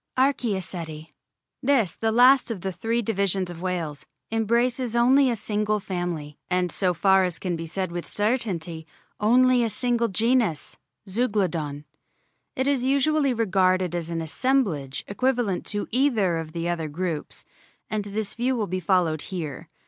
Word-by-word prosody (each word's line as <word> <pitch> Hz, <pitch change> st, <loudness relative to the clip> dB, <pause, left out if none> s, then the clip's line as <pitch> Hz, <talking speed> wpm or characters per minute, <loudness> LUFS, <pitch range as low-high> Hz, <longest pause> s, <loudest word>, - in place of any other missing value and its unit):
ARCH&OCETI 190 Hz, -, -1 dB, 0.5 s
This, 250 Hz, -, +2 dB
the 225 Hz, 0 st, 0 dB
last 250 Hz, +3 st, +6 dB
of 215 Hz, -6 st, -4 dB
the 190 Hz, -, -2 dB
three 230 Hz, +5 st, -1 dB
divisions 195 Hz, -3 st, 0 dB
of 170 Hz, -1 st, -9 dB
whales, 170 Hz, -6 st, -3 dB, 0.3 s
embraces 235 Hz, +2 st, +1 dB
only 260 Hz, +3 st, +5 dB
a 240 Hz, -, 0 dB
single 210 Hz, 0 st, -1 dB
family, 175 Hz, -6 st, -4 dB
and, 180 Hz, -1 st, +1 dB
so 180 Hz, -3 st, +1 dB
far 190 Hz, +2 st, +4 dB
as 180 Hz, -3 st, -1 dB
can 180 Hz, -2 st, -2 dB
be 165 Hz, 0 st, -5 dB
said 185 Hz, +1 st, -3 dB
with 175 Hz, 0 st, -5 dB
certainty, 185 Hz, -8 st, -1 dB, 0.3 s
only 250 Hz, +3 st, +4 dB
a 230 Hz, -, 0 dB
single 240 Hz, 0 st, 0 dB
genus, 220 Hz, -, +1 dB, 0.3 s
Zeuglodon. 185 Hz, -, -1 dB, 0.7 s
It 260 Hz, -, 0 dB
is 275 Hz, -3 st, +1 dB
usually 275 Hz, 0 st, +2 dB
regarded 185 Hz, -4 st, +2 dB
as 170 Hz, -1 st, -3 dB
an 165 Hz, -1 st, -2 dB
assemblage 165 Hz, -, 0 dB
equivalent 240 Hz, -3 st, 0 dB
to 205 Hz, 0 st, -1 dB
either 225 Hz, -9 st, +2 dB
of 155 Hz, -1 st, -7 dB
the 170 Hz, 0 st, -3 dB
other 170 Hz, -2 st, -2 dB
groups, 160 Hz, 0 st, -4 dB, 0.4 s
and 215 Hz, -1 st, -2 dB
this 205 Hz, +1 st, -3 dB
view 250 Hz, +2 st, 0 dB
will 220 Hz, -3 st, 0 dB
be 185 Hz, 0 st, -3 dB
followed 170 Hz, -4 st, +1 dB
here. 160 Hz, -8 st, -5 dB
195 Hz, 150 wpm, -25 LUFS, 175-240 Hz, 0.7 s, last